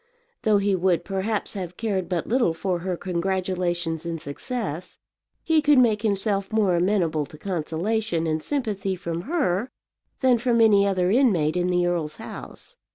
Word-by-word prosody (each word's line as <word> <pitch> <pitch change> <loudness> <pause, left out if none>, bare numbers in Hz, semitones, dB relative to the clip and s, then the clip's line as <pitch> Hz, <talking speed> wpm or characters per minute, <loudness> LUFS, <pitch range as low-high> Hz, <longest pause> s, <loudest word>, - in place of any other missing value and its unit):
Though 215 -3 +3
he 200 -1 +2
would 180 -1 +1
perhaps 200 +2 -2
have 180 -3 -6
cared 200 -5 -2
but 175 -3 -1
little 235 -9 +1
for 180 +1 -1
her 180 0 -3
congratulations 180 -2 -1
in 170 -1 -3
success, 180 - -5 0.5
he 320 -2 +3
could 295 -1 +4
make 225 -4 +4
himself 200 -2 -1
more 210 -5 +2
amenable 170 -5 +1
to 155 - -13
consolation 175 +2 -1
and 160 -1 -1
sympathy 205 - -2
from 170 -2 -4
her 255 - 0 0.5
than 255 -3 +4
from 235 -1 +2
any 205 -3 +5
other 185 -2 +1
inmate 195 - +3
in 180 0 +1
the 180 -1 +2
earl's 165 -4 -1
house. - - -10
190 Hz, 160 wpm, -24 LUFS, 170-220 Hz, 0.5 s, any